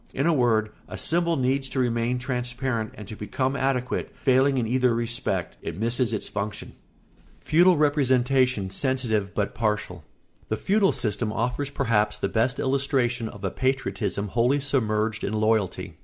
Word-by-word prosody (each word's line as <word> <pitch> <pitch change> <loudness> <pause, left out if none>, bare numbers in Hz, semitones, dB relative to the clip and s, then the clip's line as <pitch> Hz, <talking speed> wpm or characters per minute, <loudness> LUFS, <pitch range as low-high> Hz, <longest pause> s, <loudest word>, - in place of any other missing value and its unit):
In 135 - 0
a 170 - +4
word, 115 -6 +2 0.2
a - - -7
symbol 170 0 +2
needs 135 0 0
to 130 - -3
remain 120 0 +1
transparent 125 -2 -2
and 105 - -10
to 110 - -7
become 130 +7 -2
adequate; 135 -2 -1
failing 135 +1 +4
in 120 - +1
either 125 0 +2
respect, 115 -6 -2
it - - -5
misses 115 +3 0
its 110 - -2
function. 105 +1 -4
[Sidenote: - - -27
Feudal 175 +2 +5
representation 130 -7 +2
sensitive 110 -4 -1
but 100 -1 -1
partial.] 105 -7 -2 0.5
The 110 - 0
feudal 200 - +2
system 110 0 -2
offers 125 +5 -2
perhaps 115 -7 +1
the 100 - -2
best 115 +5 +1
illustration 130 -4 0
of 105 - -12
a 95 - -1
patriotism 105 -6 -1
wholly 120 +6 +2
submerged 110 -6 0
in 100 - -2
loyalty. 110 -2 0
120 Hz, 155 wpm, -25 LUFS, 110-135 Hz, 0.5 s, Feudal